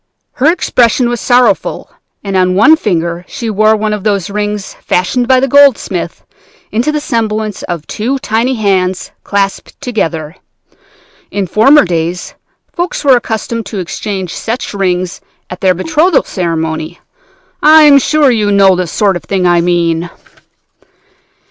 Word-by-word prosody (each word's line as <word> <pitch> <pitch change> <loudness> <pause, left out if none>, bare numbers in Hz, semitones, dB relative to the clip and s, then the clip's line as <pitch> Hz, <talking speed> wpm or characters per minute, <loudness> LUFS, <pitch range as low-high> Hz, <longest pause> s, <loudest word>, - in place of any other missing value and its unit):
Her 295 +5 +4
expression 245 -7 +1
was 240 -2 -3
sorrowful, 245 0 +1 0.3
and 195 -1 -4
on 185 0 +2
one 310 +11 +6
finger 170 - -2
she 230 -2 -5
wore 215 +1 +3
one 215 0 -2
of 210 -2 -4
those 200 -2 -1
rings 205 -1 -3
fashioned 240 +7 0
by 260 0 +4
the 270 - 0
goldsmith 280 -2 +2 0.5
into 240 +7 0
the 305 - -1
semblance 220 -6 -2
of 170 -4 -5
two 245 +6 -3
tiny 245 +1 -1
hands 190 -4 -1
clasped 200 -1 -3
together. 170 - -3 0.9
In 200 -1 -2
former 225 - +4
days 170 0 -3 0.4
folks 350 -1 -3
were 275 -3 +5
accustomed 230 -2 -3
to 200 - -6
exchange 190 0 -4
such 230 0 -4
rings 185 -2 -2 0.3
at 180 - -8
their 185 -1 +2
betrothal 280 - +1
ceremony. 160 -2 -3 0.6
I 310 +1 +7
am 285 -2 +7
sure 295 -1 +2
you 210 -3 0
know 195 -2 +4
the 180 -1 -2
sort 195 +4 0
of 175 - -6
thing 190 -2 -1
I 175 -1 +3
mean. 170 -1 0
205 Hz, 145 wpm, -12 LUFS, 180-245 Hz, 0.9 s, I